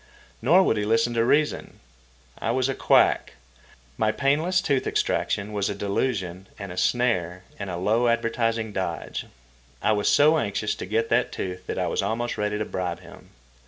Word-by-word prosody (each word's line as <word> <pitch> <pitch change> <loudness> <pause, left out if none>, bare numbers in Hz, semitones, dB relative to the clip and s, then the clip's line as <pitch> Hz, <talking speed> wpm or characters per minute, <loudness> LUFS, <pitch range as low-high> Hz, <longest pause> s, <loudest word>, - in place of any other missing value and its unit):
Nor 170 +11 +5
would 110 - +1
he 105 - 0
listen 115 +2 +2
to 115 -1 +2
reason. 150 +5 0 0.6
I - - -2
was 130 +2 +1
a 135 - -1
quack. - - +3 0.7
My 110 0 +3
painless 145 +9 +1
tooth 140 -8 0
extraction 100 +1 -1
was 100 -1 0
a - - -3
delusion 95 -3 -2
and 100 -2 -7
a - - -7
snare 90 -4 0 0.2
and 100 -1 -4
a 90 - -4
low 110 +7 +2
advertising 115 -1 0
dodge. 90 -4 -4 0.5
I - - +1
was 105 -1 +2
so 155 +2 +5
anxious 105 -1 -1
to - - -6
get 115 +3 0
that 120 +2 +2
tooth 90 -1 -5
that - - -3
I - - 0
was - - 0
almost 120 +2 -2
ready 105 0 -1
to 105 - -2
bribe 90 -3 -4
him. - - -15
110 Hz, 180 wpm, -25 LUFS, 100-125 Hz, 0.7 s, Nor